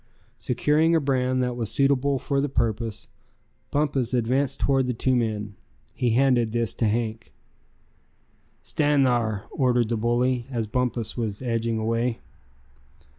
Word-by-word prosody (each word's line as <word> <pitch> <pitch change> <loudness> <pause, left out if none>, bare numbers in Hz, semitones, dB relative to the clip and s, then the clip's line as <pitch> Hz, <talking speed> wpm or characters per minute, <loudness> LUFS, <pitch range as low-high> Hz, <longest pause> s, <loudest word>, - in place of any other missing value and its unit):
Securing 150 +6 +2
a - - +4
brand 130 -2 0
that 125 -1 -2
was 115 -3 -1
suitable 140 +3 +2
for 140 +1 -1
the 145 - -1
purpose, 115 -3 -2 0.6
Bumpus 135 -4 0
advanced 125 +3 0
toward 135 -2 +2
the 125 - -1
two 130 +2 +1
men. 105 -4 -2 0.4
He 125 - 0
handed 125 -3 +3
this 115 -2 0
to 115 - 0
Hank. 110 +1 -2 1.3
"Stand 145 -2 +2
thar!" 115 -5 0
ordered 125 -4 +1
the 115 - 0
bully, 120 +2 0
as 120 -4 -2
Bumpus 120 0 -2
was 110 -1 -3
edging 115 -2 -1
away. 115 +2 -1
120 Hz, 135 wpm, -25 LUFS, 115-130 Hz, 1.3 s, a